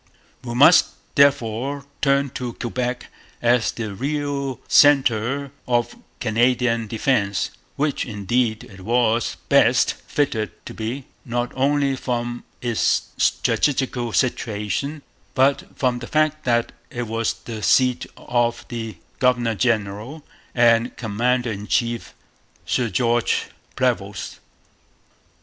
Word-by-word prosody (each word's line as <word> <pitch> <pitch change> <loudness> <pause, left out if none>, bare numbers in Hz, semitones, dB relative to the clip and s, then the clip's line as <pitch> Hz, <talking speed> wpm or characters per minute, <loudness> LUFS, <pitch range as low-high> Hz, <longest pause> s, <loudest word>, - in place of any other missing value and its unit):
We 120 -1 -5
must 145 +8 +7 0.3
therefore 140 0 +2 0.2
turn 140 -1 +2
to 125 -2 -5
Quebec 125 +1 -3 0.3
as 120 -1 +2
the 110 -3 -5
real 140 +1 -2
centre 135 -1 +4 0.2
of 120 -1 0 0.2
Canadian 115 0 +1
defence, 110 -3 0 0.2
which, 145 -1 0
indeed, 110 +1 -1
it 95 -1 -13
was 115 +2 +1
best - - +4
fitted 110 - -2
to - - -7
be, 120 +5 -4 0.2
not 120 0 -2
only 140 +1 +1
from 120 -2 -3 0.2
its 120 -3 +1
strategical 130 -4 +1
situation, 120 - -1 0.3
but 135 +1 +3
from 125 -2 +1
the 120 - -7
fact 155 0 +1
that 120 -1 +1 0.2
it 120 - -4
was 115 0 -1
the 110 -2 -8
seat 125 +2 +3
of 120 0 -1
the 115 -3 -5 0.2
governor 120 -3 +2
general 110 +5 -1 0.3
and 120 -1 +3
commander 120 +2 0
in 105 0 -6
chief, 120 0 -1 0.5
Sir 120 -3 0
George 120 0 +1 0.3
Prevost. - - -2
120 Hz, 110 wpm, -22 LUFS, 115-135 Hz, 0.5 s, must